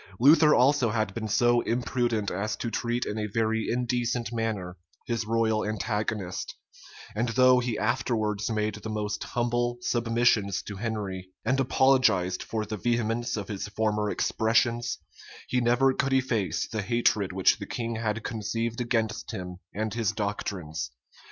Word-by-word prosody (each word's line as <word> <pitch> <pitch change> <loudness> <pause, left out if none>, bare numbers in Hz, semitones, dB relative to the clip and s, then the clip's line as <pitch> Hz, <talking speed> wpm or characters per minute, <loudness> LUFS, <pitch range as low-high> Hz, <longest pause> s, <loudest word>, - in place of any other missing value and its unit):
Luther 150 +4 +7
also 130 -1 +4
had 110 0 -1
been 110 -2 -4
so 120 +3 +3
imprudent 120 -3 0
as 105 +4 -2
to 115 - -4
treat 120 +1 -1
in 105 - -3
a 105 - -1
very 110 0 0
indecent 120 -1 -1
manner 105 -6 -2 0.3
his 115 -2 -2
royal 110 -1 +1
antagonist; 105 -3 -3 0.6
and 115 +3 0
though 130 +1 +5
he 120 -3 -2
afterwards 110 -2 0
made 105 -1 0
the 105 +1 -7
most 105 -1 -2
humble 120 0 -1
submissions 115 -5 +1
to 100 - -7
Henry, 100 -4 -4 0.2
and 130 +1 +2
apologized 125 -9 +3
for 110 -1 -3
the 105 +1 -4
vehemence 120 +1 0
of 100 -2 -4
his 105 -2 -4
former 105 0 0
expressions, 120 +3 +1 0.5
he 125 - +1
never 125 +3 +3
could 135 +1 0
efface 125 -7 0
the 110 -1 -3
hatred 105 -3 +1
which 95 0 +3
the - - -6
king 115 -1 -3
had 110 0 -2
conceived 115 +2 -2
against 115 -2 -1
him 90 -1 -6
and 110 0 -3
his 115 -4 0
doctrines. 90 - -3
115 Hz, 150 wpm, -27 LUFS, 105-120 Hz, 0.6 s, Luther